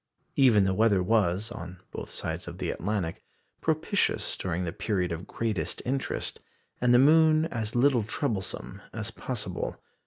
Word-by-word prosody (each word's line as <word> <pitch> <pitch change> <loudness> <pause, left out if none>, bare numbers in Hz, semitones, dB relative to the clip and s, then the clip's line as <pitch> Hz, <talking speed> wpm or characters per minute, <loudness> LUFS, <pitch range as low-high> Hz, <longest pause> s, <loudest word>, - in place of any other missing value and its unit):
Even 120 -7 +6
the 95 0 +2
weather 100 -2 +3
was, 100 0 +2
on 90 +2 -7
both - - -6
sides - - -4
of - - -7
the - - -2
Atlantic, 95 -3 -2 0.4
propitious - - +1
during 90 0 -2
the 85 -1 -3
period 95 -4 -1
of 85 +3 -5
greatest 115 -2 -2
interest, 135 +2 -2 0.4
and 120 0 +4
the 120 - +7
moon 155 +3 +6
as 110 -2 -3
little 125 0 +4
troublesome 100 -3 -3
as 110 0 -4
possible. 110 -6 -4
110 Hz, 150 wpm, -28 LUFS, 95-120 Hz, 0.4 s, the